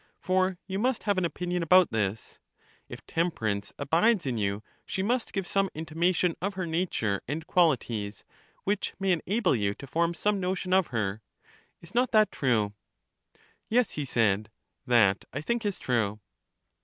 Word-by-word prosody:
for 185 0 +1
you 190 +1 -3
must 250 +2 0
have 200 -3 +1
an 180 - 0
opinion 180 +1 -2
about 180 +2 +5
this: 105 -1 -2 0.5
if - - -9
temperance 110 - -1
abides 170 - +2
in 130 -3 -1
you, 100 -1 -1 0.2
she 190 - -3
must 240 +3 0
give 195 -2 -2
some 195 +1 +1
intimation 165 +2 0
of 200 +1 -2
her 185 -1 -2
nature 160 - -1
and 155 +3 -3
quali 170 -7 +4
ties, 105 -3 -6 0.4
which 205 0 -1
may 195 -1 +1
enable 180 - +1
you 100 -3 0
to - - -10
form 170 +5 0
some 205 +4 +1
notion 185 0 -1
of 190 -2 +4
her. 110 -3 -2 0.6
Is 170 - -13
not 245 +1 +2
that 215 -1 +5
true? 110 -6 +1 1.0
Yes, 240 -1 +2
he 150 - -3
said, 110 -4 +1 0.4
that 115 -5 +4
I 140 - -2
think 235 +10 -1
is 200 - -2
true. 110 -4 -1
170 Hz, 165 wpm, -28 LUFS, 115-190 Hz, 1.0 s, about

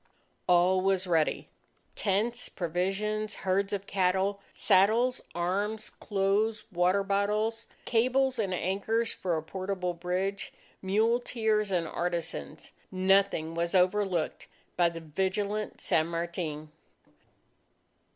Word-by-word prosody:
All 180 +1 +4
was 190 0 +1
ready 165 -3 +1 0.5
tents, 220 +5 -1
provisions, 195 +5 -2
herds 195 +1 +1
of 200 -1 -3
cattle, 190 +1 +1
saddles, 225 +6 +3
arms, 200 +5 -1
clothes, 210 +2 0
water 180 +2 +2
bottles, 210 +3 0 0.2
cables 255 +2 +2
and 200 -4 0
anchors 200 +5 -1
for 175 -3 -1
a 155 - -4
portable 185 +1 -3
bridge, 185 +3 -3 0.3
muleteers 220 +1 +1
and 175 -4 0
artisans. 170 - -4 0.2
Nothing 190 -3 +2
was 170 +2 -1
overlooked 185 -2 +1 0.3
by 175 -1 +4
the 165 0 -8
vigilant 195 +6 -2
San 155 0 +1
Martin. 165 -3 -4
195 Hz, 100 wpm, -29 LUFS, 180-210 Hz, 0.5 s, All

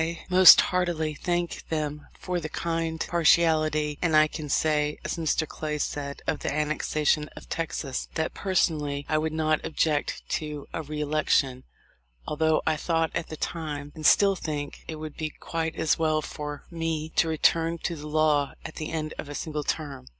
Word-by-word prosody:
most 185 0 +10
heartily 175 -4 0
thank 175 +2 -2
them 150 -2 -3
for 180 -1 -2
the 155 -2 -5
kind 165 0 -2
partiality, 155 -3 +3
and 165 -3 +2
I 155 0 +7
can 155 -1 -7
say, 150 0 +1
as - - -2
Mr. 160 -1 0
Clay 150 0 -4
said 140 -1 -4
of - - -1
the - - -2
annexation 150 0 0
of - - -11
Texas, 160 -5 -3
that, 160 - -1
'personally, 150 -7 0
I 155 - +2
would 160 0 -1
not 155 -1 +1
object' 155 -2 -1
to 150 -2 -6
a - - -2
re 150 0 -5
election, 140 -3 +1 0.6
although 160 +1 +1
I 160 -1 +2
thought 165 +1 0
at 165 - -3
the 155 - -6
time, 150 -4 -4
and 155 - -9
still 195 +5 +5
think, 150 -5 -5
it 160 - -4
would 155 -1 -8
be 155 -1 -2
quite 160 +1 -4
as 160 - +1
well 155 -1 +1
for 150 -1 -6
me 165 -2 -2
to 165 - +4
return 165 +1 +2
to 170 - -1
the 150 -1 -8
law 150 -2 +2
at - - -8
the 155 - -4
end 155 -1 -3
of 145 - -6
a 145 - -6
single 150 -1 -3
term. 145 - -4
155 Hz, 180 wpm, -27 LUFS, 150-165 Hz, 0.6 s, most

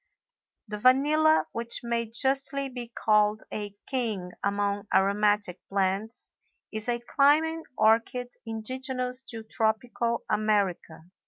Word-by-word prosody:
The 210 0 -5
vanilla, 300 +6 +4
which 235 0 -2
may 235 -1 -1
justly 275 +3 +1
be 245 -2 -7
called 215 -2 +2
a 205 -1 -4 0.2
king 220 -9 -2
among 200 0 -1
aromatic 205 -1 +2
plants, 195 +4 -1 0.4
is 220 +2 -1
a 240 - +1
climbing 310 +6 +3 0.2
orchid 230 +3 +2
indigenous 250 +3 -2
to 225 -1 -6
tropical 230 +1 -1
America. 200 -6 0
225 Hz, 105 wpm, -27 LUFS, 210-255 Hz, 0.4 s, vanilla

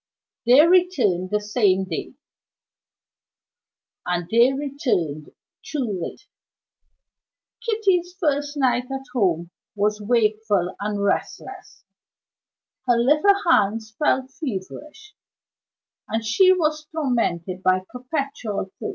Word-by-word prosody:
They 265 +6 +7
returned 310 - +2
the 210 +1 +1
same 205 -3 +1
day 185 +7 -5 1.9
and 175 -1 -2
they 235 +3 +5
returned 260 - -2 0.3
too 240 -11 -3
late. 415 - -7 1.4
Kitty's 395 -6 +1
first 290 -2 -1
night 250 -2 +1
at 270 0 -5
home 175 -7 0 0.2
was 210 +1 0
wakeful 215 -4 +1
and 205 0 -2
restless; 200 - -4 1.0
her 240 -1 +4
little 300 +12 +3
hands 220 -4 +2
felt 265 +1 0
feverish, 295 - -7 0.9
and 225 0 -2
she 370 - +5
was 310 -4 0
tormented 230 - -2
by 185 0 +2
perpetual 250 -7 -4
thirst. - - -4
240 Hz, 100 wpm, -23 LUFS, 200-295 Hz, 1.9 s, They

